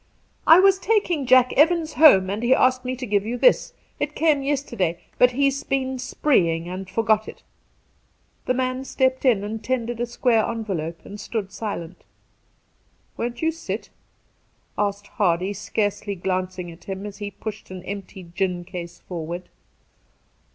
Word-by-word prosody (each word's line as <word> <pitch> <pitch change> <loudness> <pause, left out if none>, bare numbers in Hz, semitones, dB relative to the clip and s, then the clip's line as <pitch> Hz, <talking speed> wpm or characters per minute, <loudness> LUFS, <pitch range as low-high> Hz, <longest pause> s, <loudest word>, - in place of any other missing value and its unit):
' - - -36
I 325 +2 +9
was 385 0 +5
taking 360 - +1
Jack 255 -1 +5
Evans 325 +1 +3
home 195 -12 +6
and 205 +2 -3
he 245 +2 +4
asked 255 0 +3
me 255 0 -3
to 255 0 -5
give 205 -3 +1
you 235 +3 -3
this. 255 +1 +3 0.3
It 300 - -2
came 305 -3 +3
yesterday, 240 - -1 0.2
but 250 - +7
he's 275 +1 +1
been 265 -1 -1
spreeing 175 - +1
and 185 +1 -6
forgot 215 +1 +1
it.' - - -10 1.0
The 255 - +2
man 255 0 -1
stepped 260 0 0
in 225 -6 +4
and 215 +2 -5
tendered 240 -2 -2
a 240 - -1
square 235 -2 +2
envelope, 180 -9 -4
and 205 - -9
stood 210 -1 -4
sUent. 190 -4 -5 0.6
' - - -41
Won't 240 +4 -4
you 320 - +3
sit 330 - -6 0.4
?' - - -42
asked 205 0 -1
Hardy, 185 -1 0
scarcely 205 0 -2
glancing 185 -1 -3
at 165 - -15
him 195 +1 -5
as 205 0 -8
he 205 -1 -4
pushed 210 +2 -8
an 185 -1 -8
empty 195 -1 -7
gin 175 +1 -2
case 175 -2 -8
forward. 175 0 -6
220 Hz, 165 wpm, -23 LUFS, 190-260 Hz, 1.0 s, I